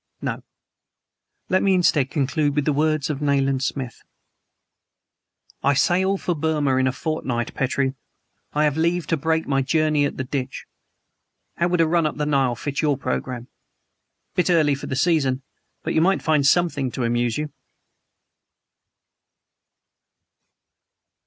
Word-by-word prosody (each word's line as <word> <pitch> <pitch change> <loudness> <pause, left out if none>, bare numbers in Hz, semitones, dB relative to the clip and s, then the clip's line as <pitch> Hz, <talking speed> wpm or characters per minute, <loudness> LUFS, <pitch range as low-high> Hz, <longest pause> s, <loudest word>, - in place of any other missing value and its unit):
No, - - -3 1.1
let 185 0 +2
me, 195 -1 +3
instead, 155 -7 +3
conclude 145 0 0
with 150 -2 +1
the 150 - +2
words 155 0 +1
of 145 -1 -5
Nayland 135 -2 +1
Smith: 130 -3 -3 1.6
"I 140 +1 +2
sail 185 +7 +2
for 180 - -1
Burma 150 -4 0
in 130 0 +2
a - - +2
fortnight, 125 -4 -3
Petrie. 135 0 0 0.6
I 150 - +1
have 150 -1 +1
leave 170 +1 +1
to 165 - +1
break 160 +2 0
my 135 -1 +2
journey 155 +1 +2
at 140 - -3
the 130 - -2
Ditch. 130 0 -4 0.9
How 170 - +2
would 180 -1 +2
a 165 - +3
run 165 -1 +2
up 150 - -5
the 150 - -1
Nile 135 -4 +1
fit 140 +5 -3
your 145 -3 +1
programme? 120 - -3 0.9
Bit 180 - +1
early 155 -4 +4
for 140 - -5
the 130 - -2
season, 135 -3 +1 0.4
but - - -2
you 160 - +3
might 190 +3 +2
find 150 -3 +3
something 145 -5 +2
to 130 - -2
amuse 120 0 0
you!" 150 0 -3
145 Hz, 145 wpm, -23 LUFS, 135-160 Hz, 1.6 s, early